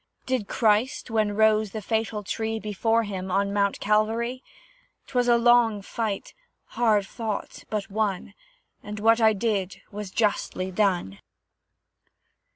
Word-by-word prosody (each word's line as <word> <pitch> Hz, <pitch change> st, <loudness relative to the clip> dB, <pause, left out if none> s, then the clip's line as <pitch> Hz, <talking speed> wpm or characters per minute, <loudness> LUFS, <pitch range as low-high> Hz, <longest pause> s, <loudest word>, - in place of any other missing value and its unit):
Did 255 Hz, -6 st, -1 dB
Christ, 230 Hz, +1 st, +1 dB
when 215 Hz, -2 st, +1 dB
rose 215 Hz, 0 st, +3 dB
the 220 Hz, -, -3 dB
fatal 220 Hz, -1 st, -1 dB
tree 220 Hz, +2 st, -2 dB
Before 225 Hz, +2 st, 0 dB
him, 190 Hz, -3 st, -5 dB
on 200 Hz, +2 st, 0 dB
Mount 200 Hz, -1 st, +1 dB
Calvary? 225 Hz, +4 st, 0 dB, 0.6 s
'Twas 245 Hz, -1 st, 0 dB
a 240 Hz, -1 st, +5 dB
long 235 Hz, -3 st, +4 dB
fight, 215 Hz, -2 st, -4 dB, 0.4 s
hard 215 Hz, -4 st, +2 dB
fought, 220 Hz, 0 st, -5 dB
but 210 Hz, -1 st, -3 dB
won, 205 Hz, -3 st, -2 dB, 0.5 s
And 210 Hz, 0 st, -7 dB
what 225 Hz, +2 st, +4 dB
I 220 Hz, -1 st, +5 dB
did 200 Hz, -3 st, -2 dB
was 210 Hz, -1 st, -6 dB
justly 190 Hz, -3 st, -1 dB
done. 180 Hz, -, 0 dB
215 Hz, 130 wpm, -25 LUFS, 200-225 Hz, 0.6 s, a